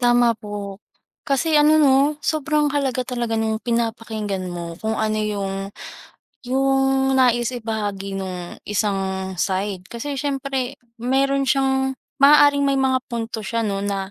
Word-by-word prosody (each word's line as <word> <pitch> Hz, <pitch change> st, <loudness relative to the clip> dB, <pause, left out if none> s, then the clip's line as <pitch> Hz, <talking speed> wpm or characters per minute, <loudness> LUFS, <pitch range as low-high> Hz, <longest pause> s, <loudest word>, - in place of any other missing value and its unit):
Tama 240 Hz, -1 st, +4 dB
po. 205 Hz, -2 st, -7 dB, 0.4 s
Kasi 305 Hz, +3 st, 0 dB
ano 300 Hz, +1 st, +6 dB
'no, 285 Hz, +1 st, +4 dB
sobrang 300 Hz, -1 st, +1 dB
halaga 265 Hz, -3 st, 0 dB
talaga 240 Hz, -2 st, -2 dB
nung 220 Hz, 0 st, -1 dB
pinapakinggan 225 Hz, -4 st, -2 dB
mo 170 Hz, -1 st, -6 dB
kung 220 Hz, 0 st, -1 dB
ano 215 Hz, 0 st, 0 dB
yung 200 Hz, -2 st, -2 dB, 0.9 s
yung 270 Hz, +1 st, +2 dB
nais 240 Hz, -2 st, +3 dB
ibahagi 210 Hz, -4 st, -3 dB
nung 180 Hz, -2 st, -6 dB
isang 195 Hz, -2 st, -1 dB
side. 190 Hz, 0 st, -1 dB
Kasi 275 Hz, +5 st, -5 dB
siyempre 275 Hz, -2 st, -2 dB, 0.2 s
meron 275 Hz, +3 st, +1 dB
siyang 265 Hz, -1 st, +1 dB, 0.3 s
maaaring 285 Hz, 0 st, +6 dB
may 275 Hz, -, +2 dB
mga 260 Hz, -1 st, +2 dB
punto 230 Hz, -2 st, -4 dB
siya 230 Hz, +3 st, -1 dB
'no 200 Hz, -3 st, -1 dB
na 195 Hz, -1 st, -2 dB
235 Hz, 130 wpm, -22 LUFS, 205-270 Hz, 0.9 s, ano